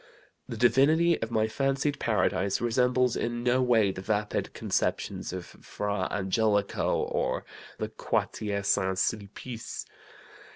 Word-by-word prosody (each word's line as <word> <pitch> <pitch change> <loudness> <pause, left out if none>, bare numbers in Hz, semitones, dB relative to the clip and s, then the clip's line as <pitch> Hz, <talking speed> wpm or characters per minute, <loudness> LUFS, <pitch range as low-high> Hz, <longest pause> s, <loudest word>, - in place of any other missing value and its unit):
The 115 - -5
Divinity 150 +8 +4
of 115 - -2
my 110 -2 +1
fancied 135 +4 0
paradise 100 -3 +1
resembles 125 +1 +2
in 120 0 -2
no 125 +1 +3
way 115 -5 +4
the 95 - -7
vapid 105 +1 -1
conceptions - - -1
of 90 -1 -5
Fra 100 -2 -3
Angelico, 100 +1 +1
or - - -1 0.3
the - - -3
Quartier 100 -2 -2
St. 95 -1 +1
Sulpice. 110 +3 -3
110 Hz, 120 wpm, -28 LUFS, 100-125 Hz, 0.3 s, Divinity